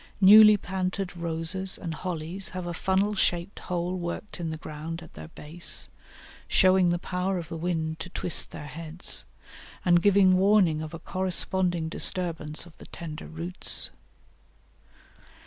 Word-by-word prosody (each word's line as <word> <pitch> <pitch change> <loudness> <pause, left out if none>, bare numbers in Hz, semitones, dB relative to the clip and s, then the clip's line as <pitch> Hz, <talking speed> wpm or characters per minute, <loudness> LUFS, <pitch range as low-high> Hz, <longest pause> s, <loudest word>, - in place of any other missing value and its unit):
Newly 210 +2 +9
planted 185 0 -3
roses 170 +3 0
and 165 -3 -5
hollies 180 +2 -3
have 180 - -4
a 175 - -4
funnel 190 +4 +1
shaped 175 -1 0
hole 180 0 -3
worked 180 +3 -5
in 165 -2 -3
the 160 - -4
ground 160 +2 -7
at 160 - -15
their 80 0 -9
base, 160 - -5 0.6
showing 185 -1 +4
the 175 - +1
power 180 +2 -2
of 170 -2 -6
the 165 - -5
wind 160 -1 -2
to 180 - -6
twist 175 -1 0
their 150 - -8
heads, 165 +4 -3 0.6
and 175 -1 +5
giving 190 -1 +5
warning 190 -5 +4
of 155 +1 -6
a - - -5
corresponding 180 -1 0
disturbance 165 -2 -1
of 175 - -16
the - - -11
tender 160 -2 -8
roots. 170 +3 -2
175 Hz, 145 wpm, -27 LUFS, 165-185 Hz, 0.6 s, Newly